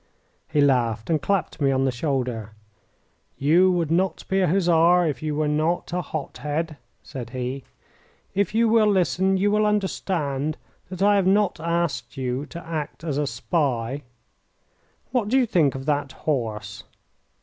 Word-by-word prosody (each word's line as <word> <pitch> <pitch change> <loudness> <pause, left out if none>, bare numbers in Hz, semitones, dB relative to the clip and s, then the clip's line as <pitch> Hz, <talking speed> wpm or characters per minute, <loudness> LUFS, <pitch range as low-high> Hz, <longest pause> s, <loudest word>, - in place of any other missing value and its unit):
He 150 - +2
laughed 120 -2 +1
and 155 -3 +2
clapped 195 -5 -1
me 140 - +3
on 135 0 +2
the 135 - +2
shoulder. 125 -5 -2 0.8
"You 170 +7 +4
would 170 -3 0
not 180 +1 0
be 190 - +1
a 185 - +3
Hussar 175 0 +4
if 145 -6 -2
you 155 -1 -2
were 155 0 0
not 155 +4 0
a 180 - 0
hot 150 -5 -6
head," 150 +3 -3 0.3
said 120 -4 -7
he. 130 +1 -4 0.7
"If 200 +2 0
you 230 +1 +4
will 220 -1 +4
listen 190 0 +2
you 205 +2 +2
will 210 0 +3
understand 160 -8 -1 0.3
that 185 0 -3
I 205 0 +5
have 190 -2 +2
not 200 -2 +2
asked 170 -3 -2
you 130 +2 -2
to 170 -1 -9
act 160 -1 -5
as 150 -4 -2
a 145 - 0
spy. 140 -5 -1 1.1
What 240 -5 0
do 250 +5 +2
you 260 - +4
think 160 - +2
of 135 0 -6
that 145 -2 -1
horse?" 110 -8 -3
155 Hz, 165 wpm, -24 LUFS, 135-185 Hz, 1.1 s, I